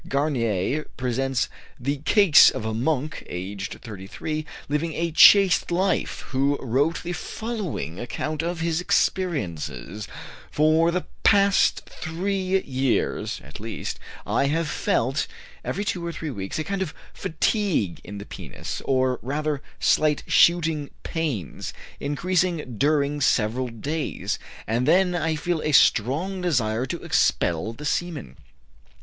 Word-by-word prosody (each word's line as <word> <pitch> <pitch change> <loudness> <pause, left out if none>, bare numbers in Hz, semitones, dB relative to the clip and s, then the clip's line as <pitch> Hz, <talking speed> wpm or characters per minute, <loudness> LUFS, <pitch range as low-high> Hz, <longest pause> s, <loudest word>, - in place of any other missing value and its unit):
Garnier 135 -2 0
presents 130 +1 0 0.3
the 140 +4 -1
case 175 +3 +7
of 130 -4 -5
a 110 - -1
monk, 140 +4 -1
aged 95 +3 -5
33, 120 +9 -5 0.2
living 150 +3 -1
a 170 +1 -1
chaste 195 +3 +7
life, 185 +3 0
who 140 +1 +1
wrote 140 +7 0
the 175 0 -3
following 190 - -4
account 150 +5 -3
of 170 0 -3
his 165 0 0
experiences: 100 - -1 0.4
"For 155 +2 +3
the 180 +1 -1 0.2
past 200 -1 +4
three 190 +3 -1
years, 130 -2 -1
at 70 +3 -11
least, 110 +2 -5 0.3
I 140 - +1
have 160 +3 0
felt, 135 -1 0 0.4
every 200 +2 -2
two 180 -3 -2
or 170 - -2
three 160 -2 -5
weeks, 95 -5 -4
a 155 - -1
kind 195 +3 -3
of 175 -5 -3 0.2
fatigue 165 - 0
in 105 - -8
the 100 - -7
penis, - - -7
or, 130 -1 +1
rather, 145 +2 -2 0.2
slight 150 -1 +3
shooting 165 -4 +3
pains, 145 - -3 0.3
increasing 165 -3 -1
during 145 0 +2
several 125 0 +2
days, 145 +7 -3 0.3
and 120 +3 0
then 180 0 +4
I 165 -2 0
feel 165 +1 -1
a 155 - -1
strong 155 - +3
desire 125 -8 +1
to - - -5
expel 85 +6 +1
the 150 +6 -9
semen. 150 - -2
150 Hz, 130 wpm, -24 LUFS, 120-170 Hz, 0.4 s, case